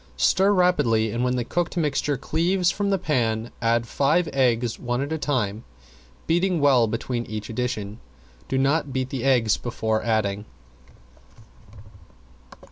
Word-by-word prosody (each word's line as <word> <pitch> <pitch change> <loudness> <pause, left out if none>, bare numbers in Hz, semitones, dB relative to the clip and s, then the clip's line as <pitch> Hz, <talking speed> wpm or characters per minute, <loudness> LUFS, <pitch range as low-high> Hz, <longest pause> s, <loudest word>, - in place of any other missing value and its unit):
Stir 190 - +3
rapidly 145 - +2
and 120 +3 -2
when 125 0 +1
the 125 - -1
cooked 175 +6 -2
mixture 150 -3 0
cleaves 175 +6 +1
from 200 +1 -2
the 195 - +2
pan 120 -9 -1
add 115 0 +1
five 150 +8 +1
eggs 120 -3 +1
one 120 0 -2
at 140 +3 -3
a 160 - -2
time, 115 -7 -1 0.6
beating 175 +1 +1
well 135 -5 +4
between 120 +2 -3
each 110 0 -6
addition. 110 -3 -3 0.5
Do 135 - 0
not 140 +2 +1
beat 130 0 -3
the 130 -3 -3
eggs 125 -6 +3
before 110 -2 -2
adding. 105 -3 -1
125 Hz, 140 wpm, -24 LUFS, 115-155 Hz, 0.6 s, well